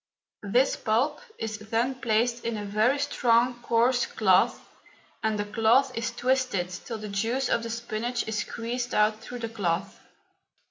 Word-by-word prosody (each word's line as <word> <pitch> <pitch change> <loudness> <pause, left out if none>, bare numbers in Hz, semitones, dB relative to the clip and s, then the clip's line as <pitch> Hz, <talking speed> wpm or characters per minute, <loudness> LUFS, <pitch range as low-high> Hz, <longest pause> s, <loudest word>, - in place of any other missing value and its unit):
This 240 +7 +2
pulp 255 - 0 0.2
is 220 -1 -4
then 225 +4 0
placed 240 -1 0
in 230 -1 -2
a 205 - -5
very 215 +7 +2
strong, 245 -3 +2
coarse 240 +2 +2
cloth, - - +3 0.6
and 220 -1 0
the 205 - -1
cloth 225 +5 +3
is 230 0 -2
twisted 245 -7 0
till 220 +6 -6
the 215 0 -7
juice 230 +6 -1
of - - +2
the 230 - -5
spinach 235 +1 -3
is 220 -1 -2
squeezed 240 +3 -3
out 215 +1 +3
through 245 +2 -8
the 230 -1 -4
cloth. 195 -3 -2
230 Hz, 155 wpm, -27 LUFS, 215-245 Hz, 0.6 s, cloth